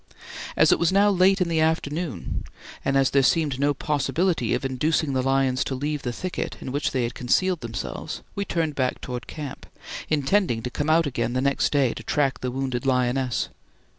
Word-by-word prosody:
As - - +6
it - - +4
was 170 0 +3
now 200 +2 +4
late 190 +1 +4
in 180 - +2
the 165 -1 +1
afternoon, 155 - -1 0.4
and 135 - +2
as 135 -1 +3
there 140 - +4
seemed 145 -1 +2
no 145 +1 +3
possibility 155 +6 0
of - - -3
inducing 140 +3 0
the 130 - +1
lions 135 0 +2
to 135 - -2
leave 145 +2 -2
the 125 - -3
thicket 185 +9 -4
in 130 - -6
which 145 +2 0
they 130 -2 -1
had 120 +1 -2
concealed 175 +9 +1
themselves, 115 -5 -5
we 200 - -2
turned 165 -5 -1
back 130 -2 -1
towards 125 -1 -5
camp, 150 -4 -7 0.4
intending 145 - +1
to 125 - -4
come 145 +4 -2
out 165 +1 +4
again 130 -3 -1
the 130 - 0
next 140 0 +1
day 135 -5 +2
to - - -8
track 140 -2 0
the 125 - -2
wounded 130 -1 -2
lioness. 125 -1 +1
140 Hz, 195 wpm, -25 LUFS, 130-160 Hz, 0.4 s, As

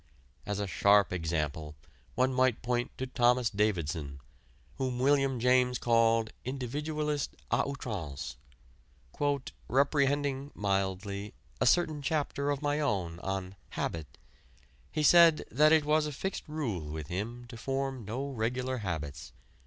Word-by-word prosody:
As 105 0 -2
a 100 - -1
sharp 100 0 +4
example 80 -3 -2 0.4
one 130 +1 +2
might 130 -2 +2
point 120 +1 0
to 130 - -2
Thomas 125 -2 +2
Davidson, 85 -9 -1 0.6
whom 130 -2 -1
William 135 -1 +2
James 125 +1 +3
called 115 -1 +3
"individualist 145 +3 -2 0.2
à 120 - +3
outrance".... 95 - -5 1.3
"Reprehending 140 0 +1
(mildly) 100 0 -2 0.3
a - - +4
certain 160 -4 +3
chapter 145 -1 -1
of 145 0 -1
my 145 +1 +1
own 95 - -1
on 95 0 -4 0.2
'Habit,' 80 -6 -4 0.7
he 155 - -1
said 170 0 +7
that 150 +5 +5
it 160 -2 +5
was 150 0 +3
a - - -4
fixed 190 +7 -4
rule 115 - -3
with 80 -1 -5
him 115 +7 -4
to 120 - -9
form 135 +1 -3
no 120 +7 -3
regular 125 +2 -1
habits. 80 -6 -5
125 Hz, 130 wpm, -30 LUFS, 95-140 Hz, 1.3 s, said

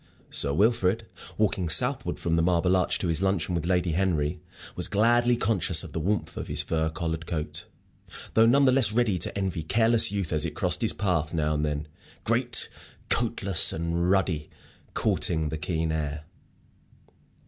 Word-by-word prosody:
Sir 70 - +2
Wilfrid, 110 +4 +1 0.3
walking 95 -5 0
southward - - +2
from 85 -1 -1
the 85 - +2
Marble 90 +1 +2
Arch 90 -1 +1
to 90 - -3
his 85 +1 0
luncheon 95 -3 0
with 85 -1 -2
Lady 90 -2 +1
Henry, 85 -2 -1 0.3
was - - -1
gladly 120 +3 +2
conscious 95 -7 +1
of - - -9
the - - -2
warmth 100 +6 -2
of - - -5
his - - -1
fur 80 -1 -1
collared 80 0 -4
coat, 80 -3 -5 0.7
though 110 0 +5
none 140 +4 +4
the 130 - +5
less 125 -5 +3
ready 110 -5 +1
to - - -3
envy 95 -4 -2
careless 110 +6 +3
youth 100 -6 -3
as 75 -1 0
it - - -4
crossed - - +1
his - - +2
path 85 -5 -1
now 75 -1 0
and 75 0 -1
then, 75 0 -3 0.4
great - - +2 0.4
coatless 110 -6 +2
and 85 +2 -1
ruddy, 95 -6 0 0.5
courting 80 -2 0
the 80 - -4
keen 80 0 -2
air. 75 -1 -3
90 Hz, 170 wpm, -26 LUFS, 80-100 Hz, 0.7 s, though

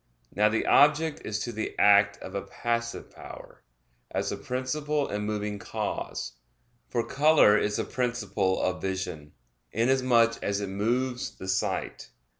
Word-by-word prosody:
Now, 105 +1 +3
the 115 - 0
object 150 +2 +4
is 110 - -2
to 120 - -3
the 110 -1 -5
act 100 0 +5
of 95 - -8
a 100 - -2
passive 115 +2 -3
power, - - -12 0.5
as - - -2
the - - -2
principle 145 +3 -2
and 105 0 -3
moving 105 -1 -3
cause: 90 - -4 0.6
for 120 -1 -1
color 150 -7 +5
is 105 0 +1
the - - 0
principle 110 -6 -1
of 90 0 -1
vision, 90 -6 -4 0.4
inasmuch 120 -1 +3
as 100 0 -1
it 100 -1 -4
moves 125 +6 -1
the 95 - -8
sight. 95 0 -2
110 Hz, 145 wpm, -27 LUFS, 100-125 Hz, 0.6 s, act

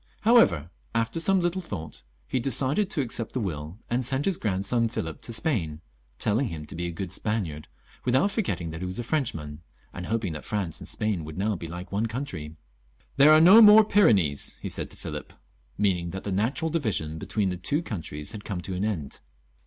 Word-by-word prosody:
However, 90 - +4 0.2
after 115 +8 0
some 190 +3 +3
little 175 +2 0
thought, 90 - -6 0.3
he 130 - 0
decided 135 - +2
to 160 - 0
accept 115 -3 -4
the 130 - -1
will, 80 -4 -4
and 125 +2 0
sent 135 +3 -1
his 195 - +2
grandson 110 +3 0
Philip 80 -8 -5
to - - -6
Spain, 110 - -1 0.4
telling 115 +6 +1
him 80 -6 -6
to 75 - -9
be 85 +1 -2
a - - -3
good 85 +1 -5
Spaniard, 95 -7 -3 0.4
without 130 +11 +2
forgetting 135 - -2
that 80 +2 -7
he 90 - -3
was 90 - -5
a 120 - -3
Frenchman, 80 - -2 0.3
and 90 0 -6
hoping 110 -6 -1
that 75 - -7
France 100 -7 -3
and - - -9
Spain 105 -6 -2
would 75 +1 -8
now 105 +2 0
be 85 -2 -6
like 90 +3 -8
one 105 +3 0
country. 110 - -5 0.3
" - - -35
There 145 +2 +8
are 155 - +8
no 190 +8 +9
more 215 0 +9
Pyrenees," 100 - +3
he - - -5
said - - -4
to - - -11
Philip, - - -7 0.4
meaning 90 -4 +1
that 95 +2 -6
the 100 - -3
natural 125 - 0
division 100 - -1
between 100 +2 -1
the - - -2
two 145 - 0
countries 75 - -5
had 105 -2 -8
come 95 -5 -4
to 95 - -5
an 90 +2 -2
end. 90 -10 -3
105 Hz, 205 wpm, -26 LUFS, 85-135 Hz, 0.4 s, no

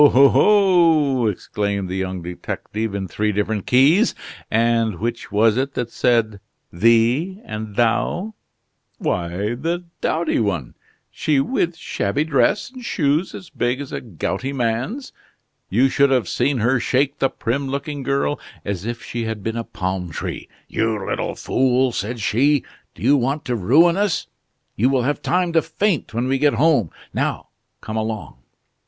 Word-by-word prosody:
oh! 140 -1 +7
oh!" 165 - +4
exclaimed 100 0 -2
the 90 - -5
young 95 -2 -3
detective, 100 +4 -4
in 95 -1 -3
three 105 +3 -1
different 105 0 -2
keys. 150 - +4 0.3
"And 115 -3 +2
which 115 +1 -4
was 110 +2 +3
it 135 +1 -1
that 120 -1 -3
said 110 -4 +1 0.3
'thee' 115 - +3
and 110 -1 -6
'thou'?" 175 - +1 0.6
"Why, 90 +5 -2
the 165 +8 -2 0.2
dowdy 165 0 0
one. 95 - -1 0.4
She 150 -3 +1
with 170 - 0
shabby 120 -2 -1
dress 160 - +1
and 255 -1 -10
shoes 155 -3 0
as 180 - -10
big 125 +2 -1
as 140 -2 -7
a - - -4
gouty 120 - -3
man's. 130 - -2 0.6
You 120 +7 +4
should 140 +1 +3
have 125 -7 +2
seen 130 +7 0
her 125 +3 +2
shake 135 +4 0
the 135 - +2
prim 135 +4 -2
looking 140 +1 -4
girl, 140 +2 0 0.3
as 100 0 -3
if 120 0 -4
she 120 -1 -4
had 110 -3 -4
been 115 +2 -2
a 115 - -2
plum 95 -3 -3
tree. - - -5 0.2
'You 110 -1 0
little - - -2
fool!' 130 0 +1
said 115 +2 -3
she, 135 +6 +2 0.3
'do - - -11
you 140 +4 +5
want 135 +4 -1
to 125 - -1
ruin 155 - +4
us? 200 -4 0 0.5
You 120 +5 +3
will 130 -2 +1
have 145 +4 -1
time 180 -1 0
to 165 - +4
faint 165 - -1
when 120 +3 -1
we 135 0 +1
get 145 0 +3
home; 145 - +3 0.2
now - - -2 0.3
come 110 0 -5
along. 110 - -4
125 Hz, 160 wpm, -21 LUFS, 110-145 Hz, 0.6 s, oh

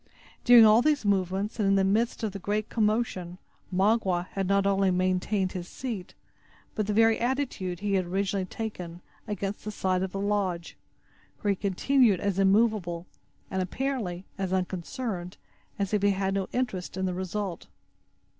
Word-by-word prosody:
During 240 -2 +9
all 215 +2 +7
these 295 -4 +1
movements, 195 +2 0
and 205 - +2
in 195 - +4
the 195 - +3
midst 225 +5 +1
of 215 - 0
the 200 - -7
general 210 +3 -1
commotion, 210 -5 0 0.3
Magua 190 -2 +1
had 195 -1 -2
not 200 0 +2
only 195 -1 +3
maintained 185 +1 +1
his 180 -1 -5
seat, 220 -7 -6 0.6
but 215 -2 -2
the - - 0
very 225 +1 +4
attitude 240 -9 -2
he 205 -1 -1
had 185 -2 +2
originally 195 +1 -1
taken, 180 -6 -6 0.3
against 205 -1 -4
the 215 - -4
side 185 -3 0
of 190 -1 -2
the 195 - -4
lodge, 195 -4 -1 0.7
where 205 - +2
he - - +1
continued 205 +2 +2
as 200 -1 -1
immovable, 195 -4 +2 0.5
and, 190 - 0
apparently, 190 -3 -3
as 190 -2 -2
unconcerned, 185 +1 -3 0.4
as 200 -1 -2
if 210 - +2
he 205 - +4
had 195 0 0
no 195 -1 -1
interest 195 -8 -3
in 190 - 0
the 185 - -1
result. 185 0 -4
195 Hz, 165 wpm, -28 LUFS, 185-215 Hz, 0.7 s, During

